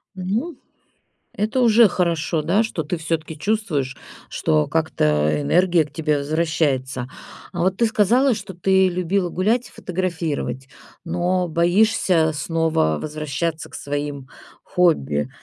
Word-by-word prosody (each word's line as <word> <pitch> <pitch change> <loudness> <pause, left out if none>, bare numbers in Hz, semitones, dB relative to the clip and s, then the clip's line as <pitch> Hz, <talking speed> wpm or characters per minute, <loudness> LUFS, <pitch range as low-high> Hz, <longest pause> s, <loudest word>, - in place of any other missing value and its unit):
Ну, 220 - -3 0.8
это 215 +5 -1
уже 230 -1 +6
хорошо, 170 -3 0
да, 185 +8 +2
что 200 -8 -3
ты 170 +4 -3
всё-таки 160 -1 -3
чувствуешь, 155 -10 -1 0.3
что 75 -1 +1
как-то 75 0 +1
энергия 170 - +3
к 150 - -17
тебе 150 -2 0
возвращается. 145 -4 -1 0.5
А 175 - -2
вот 185 +1 +1
ты 235 - +3
сказала, 240 +4 +3
что 200 -2 -8
ты 190 +1 +3
любила 180 +1 -1
гулять 225 +8 0
и - - -22
фотографировать, 165 -7 -3 0.4
но 180 +2 0
боишься 175 -1 +2
снова 150 - 0
возвращаться 155 +2 -3
к - - -11
своим 145 -1 -4 0.4
хобби, 75 - +1
170 Hz, 125 wpm, -21 LUFS, 150-190 Hz, 0.8 s, уже